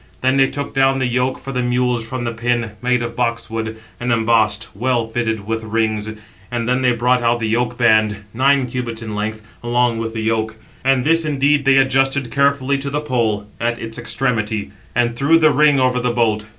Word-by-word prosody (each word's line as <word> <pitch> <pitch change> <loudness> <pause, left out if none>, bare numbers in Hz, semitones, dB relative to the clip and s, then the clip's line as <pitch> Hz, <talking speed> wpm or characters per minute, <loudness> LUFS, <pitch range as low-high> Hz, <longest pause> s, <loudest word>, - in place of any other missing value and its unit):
They 130 +1 +2
then 135 -1 +4
took 145 0 -5
down 135 0 +3
the 130 - 0
yoke 125 +1 0
for 135 - -8
the 125 -2 -1
mules 125 -1 0
from 120 +2 -5
the 115 - -2
pin, 115 -1 -1
made 125 -1 +1
of 115 0 -5
box 115 -2 -1
wood, 110 0 -4 0.2
and 120 0 -1
embossed, 110 -1 +1
well 120 +1 0
fitted 110 -3 -2
with 115 +1 -3
rings, 110 -1 -1 0.4
and 120 -1 -3
then 125 +1 +1
they 125 -1 +3
brought 125 +1 +1
out 120 0 +2
the 115 -2 -2
yoke 120 +2 -1
band, 110 -3 +3
nine 135 +2 +3
cubits 120 -2 -4
in 110 -1 -6
length, 110 +1 -4 0.2
along 120 -1 +1
with 115 0 -4
the 110 - -3
yoke. 110 0 -1 0.3
And 130 -1 +2
this 165 +2 +3
indeed 145 -1 +1
they 135 0 +5
adjusted 135 -1 +2
carefully 140 0 +1
to 140 0 -4
the 145 +2 -1
pole 115 -8 -1
at 120 0 -1
its 115 -1 -6
extremity, 110 -6 -2 0.2
and 120 0 +1
threw 140 +6 +4
the 155 -2 +4
ring 145 0 +4
over 130 -1 +2
the 125 0 0
bolt. 110 -3 0
120 Hz, 205 wpm, -19 LUFS, 115-130 Hz, 0.4 s, they